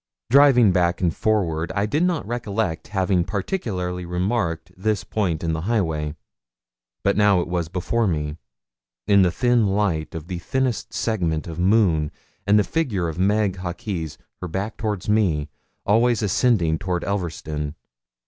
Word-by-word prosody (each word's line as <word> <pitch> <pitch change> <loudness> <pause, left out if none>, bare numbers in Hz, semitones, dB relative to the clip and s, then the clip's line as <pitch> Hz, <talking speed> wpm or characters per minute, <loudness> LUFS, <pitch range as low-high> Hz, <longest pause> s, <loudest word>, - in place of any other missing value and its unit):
Driving 130 -6 +6
back 90 -1 +1
and 90 -3 0
forward, 85 -7 0
I 100 0 +1
did 145 +9 0
not 175 - +1
recollect 110 -6 -2
having 95 -3 +1
particularly 90 - -3
remarked 90 -2 -2
this 105 +2 -1
point 90 -8 -1
in 80 -1 0
the 80 - -2
highway; 80 -9 0 0.9
but 100 - +2
now 105 -3 +4
it 85 - -2
was 85 -2 -1
before 100 +6 0
me, 75 -3 -2 0.7
in 100 -1 +5
the 90 - +4
thin 120 +2 +2
light 95 -7 0
of 80 -2 -6
the 90 -1 -5
thinnest 130 +4 -1
segment 85 -9 -1
of 85 -1 -7
moon, 90 -6 +3 0.4
and 105 +1 +5
the 105 - +4
figure 105 - -1
of 80 +2 -6
Meg 100 0 +2
Hawkes, 90 -2 -4 0.2
her 90 - -3
back 100 +6 -3
toward 105 -4 -3
me, 90 -9 +1 0.4
always 115 +2 +3
ascending 95 -6 +2
towards 90 -2 -2
Elverston. 80 -6 -3
95 Hz, 150 wpm, -23 LUFS, 85-110 Hz, 0.9 s, Driving